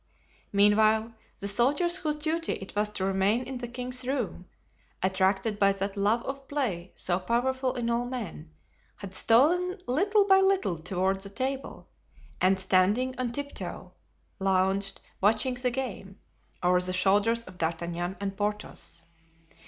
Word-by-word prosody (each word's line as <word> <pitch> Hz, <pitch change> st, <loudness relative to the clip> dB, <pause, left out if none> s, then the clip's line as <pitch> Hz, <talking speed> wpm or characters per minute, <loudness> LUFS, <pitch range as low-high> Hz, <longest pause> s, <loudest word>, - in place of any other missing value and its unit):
Meanwhile, 215 Hz, +2 st, +4 dB, 0.3 s
the 200 Hz, -, -2 dB
soldiers 290 Hz, -, +2 dB
whose 305 Hz, -4 st, -2 dB
duty 320 Hz, +2 st, -1 dB
it 195 Hz, 0 st, -8 dB
was 210 Hz, 0 st, +1 dB
to 190 Hz, -, -2 dB
remain 195 Hz, +5 st, +2 dB
in 255 Hz, 0 st, -6 dB
the 240 Hz, -, -4 dB
king's 250 Hz, +1 st, -5 dB
room, 245 Hz, -9 st, -3 dB, 0.6 s
attracted 190 Hz, +3 st, +1 dB
by 200 Hz, -1 st, +5 dB
that 195 Hz, +1 st, -3 dB
love 210 Hz, +4 st, +1 dB
of 275 Hz, 0 st, -6 dB
play 205 Hz, -12 st, -2 dB
so 180 Hz, 0 st, -1 dB
powerful 255 Hz, +5 st, 0 dB
in 240 Hz, -2 st, -2 dB
all 235 Hz, +1 st, 0 dB
men, 225 Hz, -, -6 dB, 0.5 s
had 195 Hz, -2 st, -9 dB
stolen 335 Hz, -, +3 dB
little 400 Hz, -, +3 dB
by 385 Hz, -1 st, +6 dB
little 385 Hz, -, +2 dB
toward 190 Hz, +3 st, -1 dB
the 195 Hz, -, -5 dB
table, 265 Hz, +6 st, -4 dB, 0.5 s
and 190 Hz, +1 st, +4 dB
standing 195 Hz, +7 st, +2 dB
on 250 Hz, -2 st, -1 dB
tiptoe, 285 Hz, +3 st, -6 dB, 0.5 s
lounged, 195 Hz, +1 st, +1 dB, 0.2 s
watching 220 Hz, +5 st, +3 dB
the 250 Hz, 0 st, 0 dB
game, 230 Hz, -6 st, -5 dB, 0.5 s
over 180 Hz, 0 st, +4 dB
the 185 Hz, 0 st, +1 dB
shoulders 205 Hz, +5 st, +3 dB
of 185 Hz, -4 st, -14 dB
D'Artagnan 170 Hz, +2 st, -2 dB
and 195 Hz, -1 st, -3 dB
Porthos. 210 Hz, -4 st, -3 dB
215 Hz, 145 wpm, -28 LUFS, 190-255 Hz, 0.6 s, by